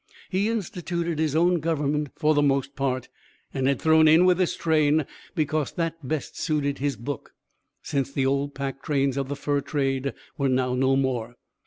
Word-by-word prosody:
He 200 +3 +1
instituted 175 -6 -2
his 155 -2 0
own 175 +2 +3
government 150 -2 0
for 155 -1 +2
the 145 - +3
most 140 -1 +1
part, 130 -2 -1 0.5
and 135 -1 0
had 140 -2 +2
thrown 160 0 +5
in 160 +3 +6
with 180 0 +4
this 185 - +1
train 155 -2 +2 0.3
because 155 -2 0
that 165 -1 -2
best 155 0 -3
suited 145 -3 -1
his 140 -1 0
book, 125 +6 -6 0.5
since 140 -2 -1
the 135 -1 0
old 140 +1 0
pack 135 0 -4
trains 140 -3 0
of 135 -1 -2
the 145 - -2
fur 145 0 -1
trade 135 -1 -1 0.2
were 140 -1 +2
now 125 -1 +1
no 130 +1 +2
more. 125 -3 -1
145 Hz, 180 wpm, -25 LUFS, 135-160 Hz, 0.5 s, in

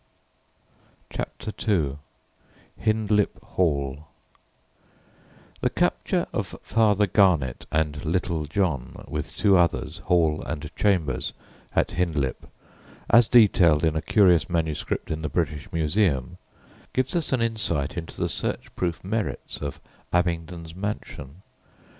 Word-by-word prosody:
CHAPTER 110 - -5 0.2
II 75 -8 +1 0.8
HINDLIP 110 -1 +1 0.2
HALL 70 -4 0 1.5
The - - +1
capture - - 0
of - - -3
Father 105 -2 +3
Garnet 90 - +2
and 75 -2 0
"Little 85 -1 -1
John" 75 -6 -2
with 75 +1 -5
two 100 -3 +5
others, 85 -2 +1
Hall 80 -3 +2
and 75 0 -6
Chambers, 85 -11 +1 0.4
at - - +3
Hindlip, 80 -7 -1 0.6
as 120 -1 +7
detailed 90 -10 +5
in 80 -1 +1
a 80 - 0
curious 90 -7 +4
manuscript 80 -3 -2
in 80 0 -2
the 75 - -2
British 80 +3 -2
Museum, 80 - 0 0.5
gives 130 +6 0
us 170 -3 0
an 125 -3 +2
insight 95 -11 -1
into 80 -1 -6
the - - +1
search - - -3
proof 85 -2 -2
merits 110 +2 -3
of 70 -2 -4 0.3
Abingdon's 85 -1 -1
mansion. 95 -5 -6
85 Hz, 115 wpm, -25 LUFS, 75-100 Hz, 1.5 s, as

